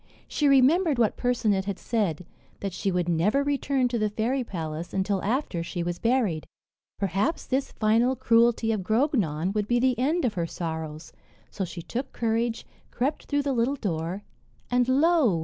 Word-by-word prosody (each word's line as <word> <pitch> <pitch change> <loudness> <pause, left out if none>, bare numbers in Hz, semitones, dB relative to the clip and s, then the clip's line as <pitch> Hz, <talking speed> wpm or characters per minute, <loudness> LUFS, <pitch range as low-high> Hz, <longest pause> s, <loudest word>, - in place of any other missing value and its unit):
She 295 - +1
remembered 280 +4 +4
what 230 -3 +2
Percinet 220 -6 +1
had 200 -2 -3
said: 190 -8 -1 0.4
that 195 -2 -3
she 195 +2 -1
would 180 -1 0
never 185 +11 +2
return 280 -2 +1
to 240 -1 -1
the 215 0 +1
fairy 235 +5 -1
palace, 165 -5 -5
until 195 0 0
after 220 - -1
she 170 +1 -4
was 175 0 -3
buried. 230 -10 +1 0.5
Perhaps 200 - -1
this 270 +1 -1
final 230 +4 +2
cruelty 230 -2 +3
of 215 -3 -1
Grognon 195 - +1
would 210 -1 -1
be 240 +1 +2
the 255 -1 +2
end 305 +6 +1
of 230 - 0
her 170 -4 -2
sorrows. 160 -2 -5 0.4
So 195 - -3
she 170 -1 -8
took 255 +8 -5
courage, 230 0 -1 0.2
crept 265 +5 -2
through 285 -1 0
the 280 -1 0
little 245 +3 +1
door, 180 - -3 0.5
and 245 0 +2
lo! 280 - +3
225 Hz, 170 wpm, -26 LUFS, 180-260 Hz, 0.5 s, remembered